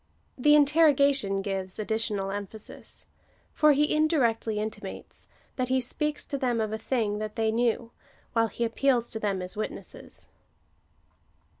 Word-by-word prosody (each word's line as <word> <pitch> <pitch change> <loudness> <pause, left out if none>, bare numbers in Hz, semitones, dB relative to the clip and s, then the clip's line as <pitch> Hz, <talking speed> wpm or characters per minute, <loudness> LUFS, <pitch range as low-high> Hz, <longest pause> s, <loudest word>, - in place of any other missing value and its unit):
The 295 +3 +5
interrogation 280 -8 +4
gives 190 -2 -3
additional 215 -2 -1
emphasis; 205 +1 -7 0.5
for 305 -1 +5
he 295 +2 +2
indirectly 250 -9 +1
intimates, 215 +1 -6 0.3
that 255 -1 -1
he 260 0 +3
speaks 295 +4 -1
to 280 - -4
them 245 -3 0
of 215 -1 -1
a 220 - -3
thing 220 -4 -1
that 215 0 -5
they 220 -1 +1
knew, 230 0 0 0.4
while 225 -1 +3
he 230 +2 -4
appeals 240 +1 +1
to 220 - -3
them 195 -3 -1
as 180 - -5
witnesses. 215 - -7
230 Hz, 140 wpm, -27 LUFS, 210-275 Hz, 0.5 s, The